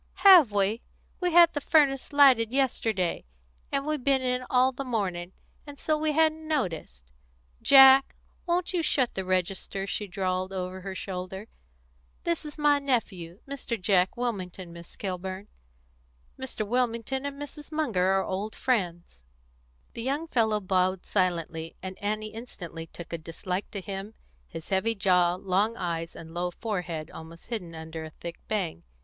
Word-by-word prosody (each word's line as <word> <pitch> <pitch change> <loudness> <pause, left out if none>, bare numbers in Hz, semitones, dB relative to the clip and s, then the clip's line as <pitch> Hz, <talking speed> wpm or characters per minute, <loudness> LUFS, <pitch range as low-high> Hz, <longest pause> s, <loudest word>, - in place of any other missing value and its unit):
"Have 350 - +9
we? 205 +3 +1 0.4
We 360 -1 0
had 340 0 +7
the 290 - -2
furnace 280 -3 +3
lighted 265 -6 +6
yesterday, 225 -9 0 0.5
and 275 0 0
we've 305 -3 -2
been 270 -1 +3
in 250 0 0
all 255 +1 +4
the 270 +1 -5
morning, 190 -8 -2 0.4
and 285 -1 -10
so 310 - +1
we 305 0 0
hadn't 315 0 +2
noticed. 175 - -3 0.5
Jack, 270 0 +8 0.3
won't 350 +2 0
you 350 - +1
shut 260 -6 +1
the 190 - -3
register?" 185 +1 -1
she 205 +1 -3
drawled 185 0 -2
over 185 0 -4
her 190 0 -6
shoulder. 190 +1 -5 0.8
"This 340 -2 -1
is 300 - -8
my 295 -1 +4
nephew, 205 -10 -2
Mr. 270 -4 -4
Jack 185 0 +2
Wilmington, 185 -7 -4
Miss 170 0 -12
Kilburn. 190 +1 -5 0.9
Mr. 260 -5 -4
Wilmington 245 +2 -1
and 285 0 -5
Mrs. 295 +1 -9
Munger 235 -13 +1
are 195 0 +2
old 200 +3 -3
friends." 175 - -1 0.7
The 230 - -5
young 280 +7 -2
fellow 220 -7 +2
bowed 185 -1 0
silently, 165 -4 -1
and 185 0 -7
Annie 215 +1 -2
instantly 175 -8 -8
took 170 0 -10
a 170 - -2
dislike 180 +4 -4
to 200 - -5
him, 195 +3 -6 0.3
his 160 - -9
heavy 205 +4 +1
jaw, 180 -3 +3
long 195 +5 0
eyes, 165 -1 -3
and 165 0 -10
low 175 +1 -1
forehead 175 -5 -4
almost 165 +4 -11
hidden 180 -8 -4
under 160 0 -7
a 160 - -7
thick 170 +2 -9
bang. 185 - -2
205 Hz, 155 wpm, -28 LUFS, 180-265 Hz, 0.9 s, Have